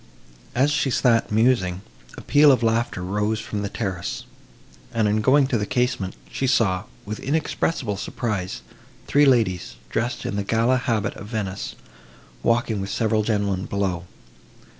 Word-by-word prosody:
As 135 +4 +3
she 140 -2 +1
sat 120 -3 +2
musing, 105 -5 +2 0.3
a - - -7
peal 145 0 +6
of 125 -3 +2
laughter 115 -4 0
rose 105 +3 0
from 105 -1 -4
the 100 - -2
terrace, 95 -5 -4 0.7
and, 110 -2 +1
on 105 +1 +2
going 135 +5 +5
to 125 -4 0
the 105 - -1
casement, 125 -7 0 0.2
she 135 - -1
saw, 100 -7 +2 0.2
with 105 +1 -5
inexpressible 140 -6 -1
surprise, 95 - -3 0.4
three 145 0 +4
ladies, 110 -9 +2 0.2
dressed 120 +2 -2
in 100 - -2
the 100 - 0
gala 115 +5 +2
habit 115 -4 -1
of 105 - -9
Venice, 105 -4 -4 0.7
walking 115 - +1
with 95 - -4
several 110 -1 +1
gentlemen 100 -3 0
below. 95 -4 -1
110 Hz, 150 wpm, -23 LUFS, 100-125 Hz, 0.7 s, peal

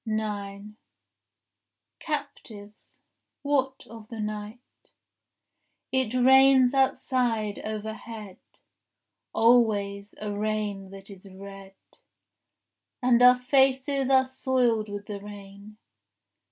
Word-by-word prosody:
9 210 -1 -5 1.2
Captives, 225 -9 -7 0.5
what 270 -2 -1
of 225 -1 -12
the 225 -1 -9
night?— 215 +3 -7 1.0
It 260 -3 0
rains 265 0 +5
outside 245 -5 0
overhead 215 -1 -7 0.9
Always, 205 -4 +2
a 210 -1 -4
rain 205 -2 -3
that 195 +1 -12
is 195 0 -13
red, 195 0 -12 1.3
And 245 -1 +4
our 250 0 +7
faces 265 +1 +1
are 265 -1 +5
soiled 250 -4 0
with 205 0 -6
the 205 -1 -6
rain. 200 +1 -12
215 Hz, 85 wpm, -26 LUFS, 205-255 Hz, 1.3 s, our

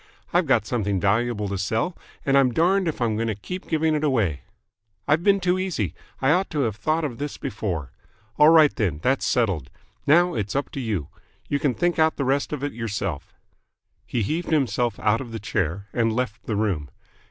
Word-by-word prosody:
I've - - +3
got - - +3
something 105 -5 -1
valuable 105 +2 +1
to 100 -1 -3
sell, 115 - -1 0.3
and 135 - +3
I'm 135 -2 +5
darned 185 +5 +3
if 160 - -2
I'm 115 -3 +1
going 115 +1 -1
to 110 - -1
keep 180 - -7
giving 160 0 +1
it 155 0 0
away. 110 - +1 0.7
I've 155 +3 +3
been 200 0 +4
too 180 0 +1
easy. 165 - -2 0.3
I 135 - +4
ought 185 +4 +2
to 150 -3 -1
have 110 -6 0
thought 155 +8 0
of 135 -5 -4
this 145 0 -4
before. 85 - -4 0.5
All 150 - +8
right, 160 -3 +6
then, 90 -9 0
that's 130 +1 +1
settled. 95 - 0 0.4
Now 175 +5 +5
it's 105 -1 -3
up 140 - -1
to - - -5
you. 105 - -2 0.4
You 140 - +1
can 140 -5 +1
think 175 +7 0
out 160 0 +4
the 140 - -2
rest 135 +2 +1
of 145 -2 -4
it 145 - -2
yourself." 100 -8 -4 0.7
He 120 - -1
heaved 160 - -2
himself 120 -7 +1
out 110 +2 +2
of 120 -3 -8
the 115 - -5
chair, 100 -1 -2
and 115 -2 +2
left 115 -1 -3
the 110 - -1
room. 95 -9 -1
120 Hz, 205 wpm, -24 LUFS, 105-155 Hz, 0.7 s, All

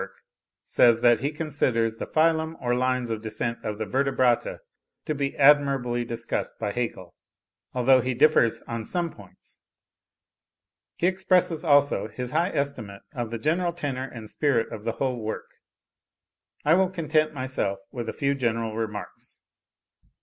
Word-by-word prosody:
42) - - -9 0.4
says, 115 -1 +4
that 120 -1 +5
he 140 +4 -1
considers 130 -8 0
the - - -5
phylum 160 0 +2
or 120 0 0
lines 125 -1 0
of 110 -1 -3
descent 115 +2 -3
of 105 -1 -3
the 110 - -3
Vertebrata 130 +1 +1 0.5
to 155 - -1
be 140 -1 -3
admirably 135 -4 +4
discussed 115 0 -4
by 105 -2 -2
Haeckel, 100 -7 -4 0.6
although 130 +1 +5
he 125 +1 -2
differs 120 -4 +3
on 115 -1 -5
some 170 +7 -2
points. - - -16 1.4
He - - -1
expresses, 180 -3 +2
also, 145 -7 +3
his 125 +3 -6
high 170 +4 +1
estimate 140 - -3
of 120 -5 -3
the 115 - -4
general 170 +7 0
tenor 135 -5 -4
and 110 -3 -9
spirit 130 -2 0
of 105 - -8
the 115 - -1
whole 125 -1 -2
work.) 110 0 -6 1.1
I 155 - +5
will 185 +1 +3
content 155 -3 0
myself 130 -7 -2
with 120 -3 -5
a - - -4
few 140 0 0
general 115 -4 -1
remarks. 105 -2 -6
130 Hz, 150 wpm, -26 LUFS, 115-150 Hz, 1.4 s, that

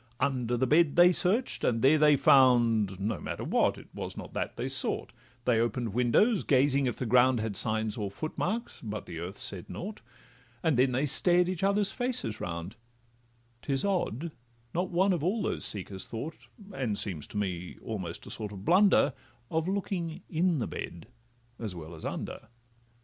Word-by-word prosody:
Under 125 -3 0
the 130 - +2
bed 150 +2 +4
they 175 +1 +7
search'd, 200 +8 0
and 115 -2 +1
there 150 +4 +6
they 150 -1 +6
found— 120 -8 +4
No 105 +3 -2
matter - - -5
what—it - - +1
was - - -6
not - - -8
that - - -3
they - - -2
sought; - - 0 0.3
They 115 -3 +3
open'd 115 -1 -1
windows, 125 - +3
gazing 140 0 +3
if 120 - -1
the 130 - -3
ground 125 +1 +4
Had 110 -2 -3
signs 110 +2 +1
or 105 -3 -2
footmarks, 180 - -4
but 105 -2 -5
the 85 - -7
earth 90 +4 -6
said 95 -3 -5
nought; 210 +4 -6 0.6
And 160 -4 +3
then 130 +1 +3
they 130 +4 +1
stared 175 +5 +3
each 185 -2 -2
other's 200 +1 +2
faces 245 - -2
round: 85 +5 -5 0.8
'Tis 135 +6 -1
odd, 170 - -1 0.4
not 180 +2 -1
one 190 +2 +3
of 165 -4 -2
all 205 +5 0
these - - -2
seekers 95 -2 -2
thought, 140 +8 -7 0.3
And 120 - -2
seems 85 -8 -2
to - - -7
me 90 -3 -3
almost 95 -7 -5
a - - -8
sort 105 -2 -5
of 95 -2 -9
blunder, 180 -5 +5 0.4
Of 160 +1 0
looking 185 -3 -3
in 170 +1 +1
the 120 - -1
bed 85 +6 -7 0.5
as 110 -6 -5
well 80 0 -8
as 80 - -10
under. - - -5
130 Hz, 175 wpm, -29 LUFS, 105-175 Hz, 0.8 s, they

